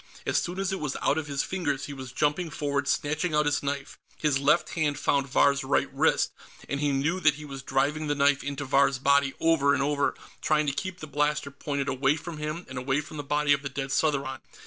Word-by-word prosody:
As - - +2
soon 175 +2 -4
as 195 0 -1
it 190 - -2
was 150 -3 -3
out 155 - +2
of 155 - -6
his 140 -1 -1
fingers, 145 -7 -2
he 145 - -7
was 130 -2 -8
jumping 150 +5 0
forward, 140 -2 -2
snatching 155 +4 0
out 150 0 +3
his 145 -1 +1
knife. 140 0 -4 0.2
His 150 -3 +1
left 145 +2 +3
hand 150 -4 0
found 140 -1 +1
Vahr's 140 +1 +3
right 135 - 0
wrist, - - +2 0.4
and 140 - -2
he 145 0 +1
knew 145 +7 0
that 150 -5 +4
he 150 +1 -9
was 135 -2 -7
driving 145 +4 0
the 145 - +1
knife 140 0 +3
into 140 0 -4
Vahr's 140 0 +3
body, 140 +1 +3
over 145 -4 +3
and - - 0
over, 145 0 +1 0.3
trying 150 -1 +2
to 140 - 0
keep 185 +5 -5
the - - -5
blaster 150 -1 0
pointed 140 0 -3
away 135 +1 +2
from 160 0 -7
him 155 +3 -4
and 130 -1 -5
away 135 +2 0
from 150 +1 -8
the 145 - -4
body 145 0 +2
of 140 - 0
the 140 - -4
dead 135 0 -4
Southron. 140 -3 0
145 Hz, 235 wpm, -27 LUFS, 140-150 Hz, 0.4 s, that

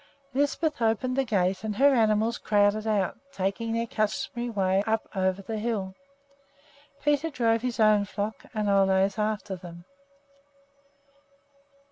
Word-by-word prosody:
Lisbeth 290 +1 0
opened 230 +3 +1
the 270 - +2
gate 190 -4 0
and 215 -1 -3
her 275 +5 +5
animals 220 -1 +2
crowded 210 +1 +2
out, 205 -1 0
taking 200 +1 -2
their 230 +1 0
customary 235 +2 -2
way 195 -2 +1
up 220 0 0
over 190 +1 0
the 220 +2 -4
hill. 210 -4 -2 1.1
Peter 295 +2 +1
drove 230 -5 +1
his 245 -1 -3
own 215 -2 +4
flock 205 +2 -5
and 215 -2 -2
Ole's 195 0 +3
after 210 -2 -2
them. 175 -1 -11
215 Hz, 130 wpm, -27 LUFS, 195-230 Hz, 1.1 s, her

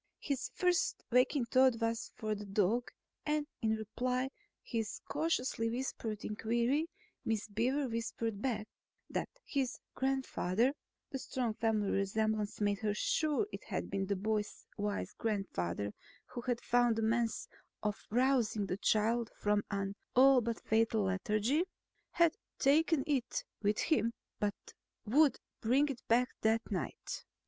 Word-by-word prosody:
His 280 -3 -2
first 360 -1 +1
waking 250 +2 +4
thought 255 -1 +4
was 230 0 -1
for 215 -1 -2
the 205 0 -6
dog 210 +5 +1 0.3
and 300 0 0 0.2
in 220 -1 +2
reply 250 +4 -1
to - - -47 0.3
his 225 -3 -3
cautiously 255 -7 0
whispered 230 -3 -3
inquiry 235 +8 +1 0.4
Miss 220 -1 -1
Beaver 250 +7 +1
whispered 230 -2 -3
back 220 -5 -1 0.4
that - - -1 0.2
his 270 -3 -1 0.2
grandfather 260 -3 +1 0.4
(the 270 - -3
strong 245 -3 -2
family 215 -2 +1
resemblance 210 +1 0
made 205 -1 +1
her 210 -1 0
sure 310 - +1
it - - -7
had - - -3
been 195 -1 -1
the 200 - +1
boy's 210 +2 -2
wise 205 0 -2
grandfather 105 - -1 0.3
who 245 - -6
had 240 -1 -1
found 240 -2 +3
a 225 - 0
means 230 +1 +1 0.4
of 210 0 -2
rousing 240 -3 +2
the 185 - -2
child 225 +3 +2
from 205 0 +2
an 195 -1 -1 0.2
all 265 0 +7
but 230 0 -2
fatal 220 -1 +2
lethargy) 210 - +1 0.5
had 340 -1 +3 0.2
taken 305 +1 +4
it 275 -6 0 0.2
with 210 0 +2
him 235 -8 +2 0.3
but 205 -1 -3 0.3
would 285 +6 +4 0.2
bring 270 +6 +3
it 265 -3 -4
again 240 +2 +5 0.2
that 225 +1 +2
night. 185 -4 -3
230 Hz, 140 wpm, -34 LUFS, 210-260 Hz, 0.5 s, all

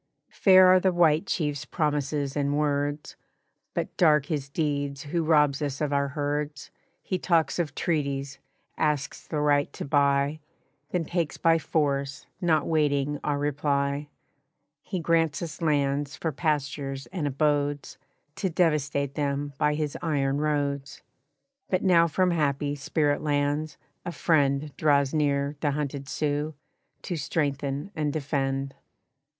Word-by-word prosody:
"Fair 185 -1 +6
are 185 0 +7
the 190 0 +2
White 170 0 +3
Chief's 145 -4 -1
promises 145 -3 -1
and 145 0 0
words, 145 0 -1 0.6
But - - -3
dark 150 -4 +4
his 145 -3 -3
deeds 145 -2 -2
who 165 +3 -1
robs 150 -3 +3
us 145 -1 -2
of 150 -2 -1
our 140 0 +2
herds. 145 0 -3 0.3
He 185 - -2
talks 170 -1 +1
of 150 -5 -2
treaties, 140 -4 -2 0.4
asks 150 -1 -1
the 155 - -2
right 145 -1 +2
to - - -6
buy, 140 +1 +2 0.5
Then 175 -3 -1
takes 170 -2 -2
by 165 0 +3
force, 140 -3 -1 0.2
not 160 -4 +2
waiting 145 -2 +1
our 145 -1 0
reply. 145 0 -1 0.7
He 185 - -4
grants 165 -2 +1
us 165 0 -7
lands 145 -1 0
for 160 - -2
pastures 140 -2 -2
and 165 -6 -2
abodes 145 0 0 0.4
To 190 - -1
devastate 145 -5 +1
them 145 -1 -2
by 150 -1 +2
his 150 -1 -2
iron 140 -3 0
roads. 145 -2 -2 0.7
But 185 - 0
now 170 -3 +5
from 180 +3 +1
happy 145 -3 0
Spirit 145 +1 0
Lands, 145 +1 -1 0.3
a 175 - -4
friend 145 -4 +1
Draws 140 -2 +3
near 145 -1 0
the 150 - 0
hunted 140 -1 -3
Sioux, 150 +1 -1 0.5
to 180 - -3
strengthen 140 +1 -2
and 150 -2 0
defend. 135 -2 -2
145 Hz, 135 wpm, -26 LUFS, 140-155 Hz, 0.7 s, are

